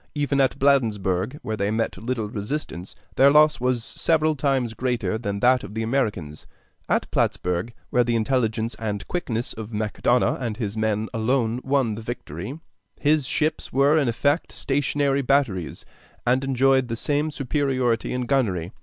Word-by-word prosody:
Even 145 -1 +1
at 135 - +1
Bladensburg, 110 -5 +1
where 110 - -2
they 100 -1 -1
met 110 +1 -1
little 115 +1 -3
resistance, 100 - -5 0.2
their 135 +1 +7
loss 150 +1 +5
was 125 -1 0
several 155 +4 +1
times 135 -5 0
greater 120 -1 -1
than 100 -3 -3
that 125 0 +4
of 105 - -9
the 110 - -1
Americans. 105 - -2 0.4
At - - +2
Plattsburg, 90 +5 0 0.2
where 125 - +4
the 120 0 0
intelligence 115 -1 0
and 105 -3 -3
quickness 120 -10 -3
of 110 0 -8
Macdonough 110 +3 +1
and 115 -4 -3
his 105 -4 -3
men 110 0 0
alone 115 +1 0
won 135 -5 +1
the 110 - -6
victory, 110 - -6 0.4
his 150 -2 +2
ships 155 0 -1
were 140 +3 +4
in 150 -4 +2
effect 140 +7 +1
stationary 140 0 0
batteries, 125 - 0 0.4
and 125 +2 +2
enjoyed 135 -1 +3
the 115 - -3
same 145 +5 0
superiority 130 -4 0
in 125 - -1
gunnery. 100 -10 0
120 Hz, 155 wpm, -24 LUFS, 110-140 Hz, 0.4 s, their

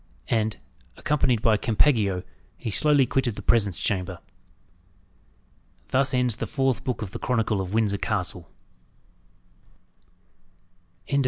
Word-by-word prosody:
And, 110 -1 0 0.4
accompanied 125 -6 +1
by 110 -2 +4
Campeggio, 105 -5 +2 0.3
he 110 - -4
slowly 145 +6 +4
quitted 125 -4 0
the - - -8
presence 100 -7 +2
chamber. 90 -2 -2 1.7
THUS 130 0 +2
ENDS 125 -3 +1
THE - - -3
FOURTH 135 -3 0
BOOK 125 -4 -2
OF 95 - -6
THE - - -6
CHRONICLE 115 -4 0
OF 95 +2 -4
WINDSOR 105 -3 +1
CASTLE 90 -4 -2
BOOK 85 - -23 2.6
V. 140 - +1
110 Hz, 120 wpm, -25 LUFS, 100-130 Hz, 2.6 s, by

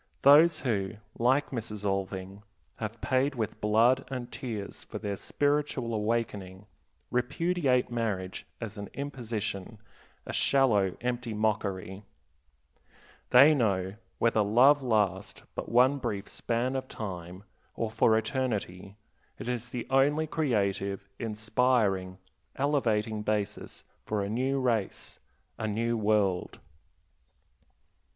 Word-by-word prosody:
Those 150 +5 +7
who, 100 -6 -1 0.3
like 130 +5 +2
Mrs. 110 -4 -5
Alving, 95 0 -3 0.4
have 110 +1 -5
paid 135 +1 +1
with 110 -4 -3
blood 115 +5 +4
and 125 -2 -5
tears 110 -6 -6
for - - -7
their 100 -1 -3
spiritual 145 -1 -1
awakening, 105 -3 -2 0.5
repudiate 135 0 +1
marriage 105 -6 -3
as 105 -3 -6
an 100 - -6
imposition, 115 -7 -4 0.5
a - - -6
shallow, 105 -9 +3
empty 120 -2 -2
mockery. 100 -3 -1 1.3
They 140 +5 +8
know, 95 -8 +1 0.2
whether 115 -2 +3
love 125 +8 +5
last 105 -6 0
but - - -5
one 130 +4 +4
brief 105 -6 -3
span 120 +3 -1
of 130 0 -3
time 90 -4 -7 0.3
or 115 -2 -2
for 110 0 +4
eternity, 105 -6 -2 0.4
it - - -7
is 120 -1 -2
the 120 -1 -4
only 145 +4 +3
creative, 100 -10 -1
inspiring, 110 -4 +1 0.4
elevating 115 -7 0
basis 105 -1 -3 0.2
for 105 -2 -1
a 100 - -3
new 130 +5 0
race, 115 -6 -2 0.4
a 110 - -1
new 115 +3 0
world. 105 -4 +1
115 Hz, 115 wpm, -29 LUFS, 100-130 Hz, 1.3 s, They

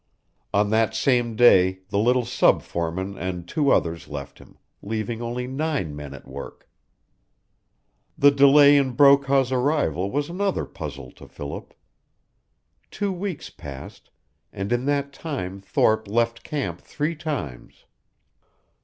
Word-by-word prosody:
On 105 +1 +1
that 110 0 +2
same 120 -2 +1
day 95 -6 +5
the 100 0 0
little 125 +3 +2
sub - - +3
foreman 90 +4 -4
and 90 -1 -4
two 145 - 0
others 85 -8 +1
left 70 -1 -8
him, - - -18 0.2
leaving 110 +2 -4
only 120 +1 -3
nine 135 - -2
men 70 -1 -8
at - - -14
work. 70 +1 -10 1.5
The 145 0 +6
delay 140 +1 +6
in 135 -3 +1
Brokaw's 140 -1 +4
arrival 125 - 0
was 145 +5 -1
another 195 +3 -1
puzzle - - -8
to - - -15
Philip. - - -8 1.1
Two 205 -1 -2
weeks 185 -2 -5
passed, 70 -1 -11 0.4
and 100 +1 -5
in 120 +1 0
that 140 0 -1
time 115 - -5
Thorpe 110 +2 +1
left 115 +2 0
camp 150 -3 -4
three 155 +3 -3
times. 140 - -6
120 Hz, 130 wpm, -24 LUFS, 95-140 Hz, 1.5 s, The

